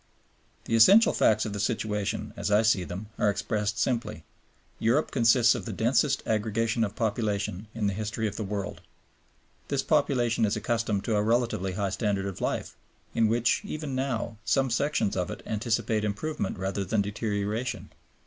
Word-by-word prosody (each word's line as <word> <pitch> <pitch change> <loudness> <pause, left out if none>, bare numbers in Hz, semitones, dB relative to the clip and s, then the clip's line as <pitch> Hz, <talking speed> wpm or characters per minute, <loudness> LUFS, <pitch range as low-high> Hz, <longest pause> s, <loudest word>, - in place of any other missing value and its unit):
The 115 - 0
essential 195 - +7
facts 110 0 +3
of 105 - -4
the 100 - -4
situation, 105 -2 -2
as - - -3
I 105 +2 +4
see 110 -4 +3
them, 95 +5 -7
are 105 - +3
expressed 105 +1 -1
simply. 115 -10 -1 0.6
Europe 125 +8 +2
consists 115 -1 +5
of 110 -6 -5
the - - -4
densest 135 +4 +1
aggregation 110 +1 0
of 105 -1 -3
population 105 -3 -2
in 110 -2 -1
the 100 - +1
history 110 +2 -2
of 105 - -5
the 110 - -3
world. 100 0 -4 0.9
This 140 -1 0
population 130 -7 +2
is 105 - +2
accustomed 110 -2 -1
to 110 -2 0
a - - +2
relatively 110 -4 0
high 100 0 -1
standard 100 -2 -1
of 95 -2 -5
life, - - -2 0.4
in 115 -1 +3
which, 120 +2 +2
even 155 -7 -5
now, 125 -4 -2
some 135 +3 +1
sections 140 -4 0
of 90 -2 -1
it 105 - -7
anticipate 110 0 -1
improvement 105 +1 -3
rather 95 +1 -2
than 100 +2 0
deterioration. 105 +3 -3
110 Hz, 170 wpm, -27 LUFS, 100-120 Hz, 0.9 s, essential